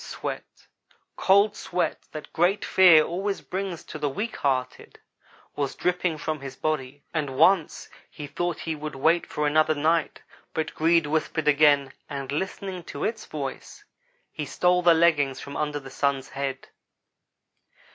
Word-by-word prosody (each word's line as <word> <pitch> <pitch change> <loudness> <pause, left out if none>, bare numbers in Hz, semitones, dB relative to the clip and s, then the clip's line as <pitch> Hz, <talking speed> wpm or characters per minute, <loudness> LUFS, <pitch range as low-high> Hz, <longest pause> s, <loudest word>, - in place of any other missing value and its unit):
Sweat - - -7 0.5
cold 200 +2 +4
sweat, 180 -1 -3
that 155 -1 -9
great 180 +5 +2
fear 175 -5 +7
always 195 +5 -3
brings 190 -2 -5
to 155 - -8
the 150 -1 0
weak 215 +11 -4
hearted 130 -2 -2 0.6
was 140 -2 -2
dripping 180 -2 0
from 155 0 -3
his 135 -1 -8
body, 145 -2 -3
and 145 -5 -2
once 165 +2 +3 0.2
he 150 - -8
thought 175 +4 -2
that - - -9
he 160 -1 -2
would 150 -1 -6
wait 160 +5 +2
for 150 - -2
another 155 +1 +3
night, 160 +3 0 0.3
but 160 -1 -2
greed 165 0 +3
whispered 155 +1 -1
again, 145 -2 +4 0.2
and 140 -2 -5
listening 190 +3 -4
to - - -7
its 220 0 -3
voice, 140 -3 -7 0.5
he 155 - -5
stole 180 +4 +2
the 170 -1 +6
leggings 155 -5 +3
from 140 - -8
under 150 -1 -2
the 135 -1 -11
Sun's 140 -2 -1
head. 135 -1 -5
155 Hz, 155 wpm, -25 LUFS, 145-175 Hz, 0.6 s, fear